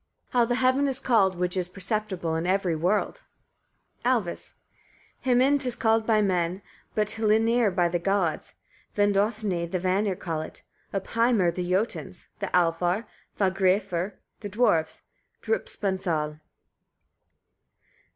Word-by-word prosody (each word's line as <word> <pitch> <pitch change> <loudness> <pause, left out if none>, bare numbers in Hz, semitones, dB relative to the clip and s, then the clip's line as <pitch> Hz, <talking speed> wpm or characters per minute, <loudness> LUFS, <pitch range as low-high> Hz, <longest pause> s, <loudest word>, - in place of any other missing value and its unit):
how 245 -1 +4
the 240 +1 0
heaven 260 +3 +2
is 265 -1 0
called, 200 -8 +3
which 180 +1 -1
is 180 -1 0
perceptible 195 -3 -3
in 165 +2 -2
every 185 -3 +1
world. 190 - 0 0.8
Alvis. 235 -8 -1 0.7
13. 250 -2 +3
Himinn 280 +3 +4
'tis 250 -3 +2
called 225 -1 +1
by 215 -2 +4
men; 180 0 0 0.3
but 215 0 0
hlyrnir 225 +1 +3
with 175 -2 +1
the 175 - 0
gods; 185 -2 -1 0.4
vindofni 205 -3 +1
the 185 - -1
Vanir 190 +2 0
call 165 -3 -3
it, 155 - -10 0.3
uppheimr 205 -2 +1
the 180 -1 -4
Jotuns, 195 +6 -2
the - - -2
Alfar 175 +4 +1 0.3
fagraræfr, 190 -1 +1 0.3
the 205 - -6
dwarfs 190 -7 +1 0.4
driupansal. 185 - -1
195 Hz, 120 wpm, -26 LUFS, 180-225 Hz, 0.8 s, how